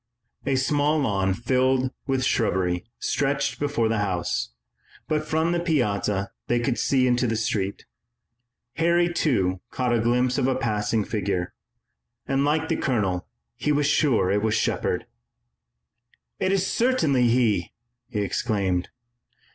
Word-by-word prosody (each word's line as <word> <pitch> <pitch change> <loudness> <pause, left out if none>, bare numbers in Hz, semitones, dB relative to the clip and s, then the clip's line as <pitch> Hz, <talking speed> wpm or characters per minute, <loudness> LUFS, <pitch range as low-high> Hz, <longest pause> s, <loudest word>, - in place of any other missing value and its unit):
A 135 - +2
small 145 +3 +2
lawn 95 -9 +1
filled 130 +3 +1 0.2
with 135 -1 0
shrubbery 90 -8 0
stretched 140 0 -1
before 145 -6 0
the 110 -1 0
house, 85 -11 -1 0.6
but 155 0 -1
from 160 +2 +1
the 175 - +1
piazza 105 - 0 0.2
they 120 - +2
could 120 0 -1
see 130 -2 +2
into 125 0 +2
the 115 - 0
street. 100 -3 -2 0.9
Harry, 170 +1 +2
too, 95 - +1
caught 125 -2 -1
a 120 - +2
glimpse 125 +3 +1
of 130 - +1
a 130 - +1
passing 110 -2 0
figure, 100 -4 -2 0.7
and 135 +1 +1
like 155 +2 +1
the - - 0
colonel 100 -9 -1 0.3
he 150 - -1
was 145 0 +2
sure 140 -9 +2
that 100 - +2
it - - -6
was 110 -1 +1
Shepard. - - 0 1.3
"It 190 - +1
is 195 -1 +2
certainly 160 - +2
he!" 115 -7 +2 0.4
he 105 -5 -2
exclaimed. 100 -3 -1
125 Hz, 140 wpm, -25 LUFS, 105-145 Hz, 1.3 s, A